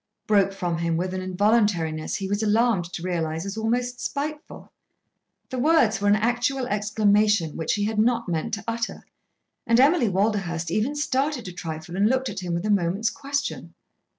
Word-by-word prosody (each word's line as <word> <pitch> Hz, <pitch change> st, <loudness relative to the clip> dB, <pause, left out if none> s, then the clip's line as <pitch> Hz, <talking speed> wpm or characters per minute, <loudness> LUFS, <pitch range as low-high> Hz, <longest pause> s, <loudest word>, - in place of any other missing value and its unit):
broke 200 Hz, -2 st, +3 dB
from 175 Hz, -4 st, -3 dB
him 170 Hz, -1 st, 0 dB
with 185 Hz, +2 st, -2 dB
an 185 Hz, -, -3 dB
involuntariness 185 Hz, -5 st, +1 dB
he 195 Hz, -, -3 dB
was 205 Hz, +2 st, -1 dB
alarmed 220 Hz, -3 st, +2 dB
to 175 Hz, 0 st, -7 dB
realise 165 Hz, -2 st, -2 dB
as 195 Hz, +1 st, -4 dB
almost 245 Hz, +3 st, -1 dB
spiteful. 300 Hz, +2 st, -5 dB, 0.8 s
The 255 Hz, -, -3 dB
words 245 Hz, -8 st, +3 dB
were 205 Hz, -, +1 dB
an 205 Hz, -, +5 dB
actual 245 Hz, +4 st, 0 dB
exclamation 210 Hz, -4 st, +2 dB
which 160 Hz, -, -1 dB
he 205 Hz, -, -1 dB
had 215 Hz, 0 st, -1 dB
not 235 Hz, 0 st, +2 dB
meant 165 Hz, +4 st, -1 dB
to 215 Hz, -, -9 dB
utter, 230 Hz, +1 st, -3 dB, 0.6 s
and 230 Hz, +1 st, +4 dB
Emily 275 Hz, -3 st, +4 dB
Walderhurst 190 Hz, -4 st, -1 dB
even 230 Hz, +10 st, 0 dB
started 275 Hz, -4 st, -1 dB
a -, -, -5 dB
trifle 160 Hz, 0 st, -6 dB
and 200 Hz, +3 st, +3 dB
looked 260 Hz, +1 st, 0 dB
at -, -, -5 dB
him 175 Hz, -2 st, -3 dB
with 170 Hz, +4 st, -3 dB
a 215 Hz, -, +1 dB
moment's 195 Hz, +3 st, +1 dB
question. 280 Hz, 0 st, -4 dB
210 Hz, 180 wpm, -24 LUFS, 180-240 Hz, 0.8 s, an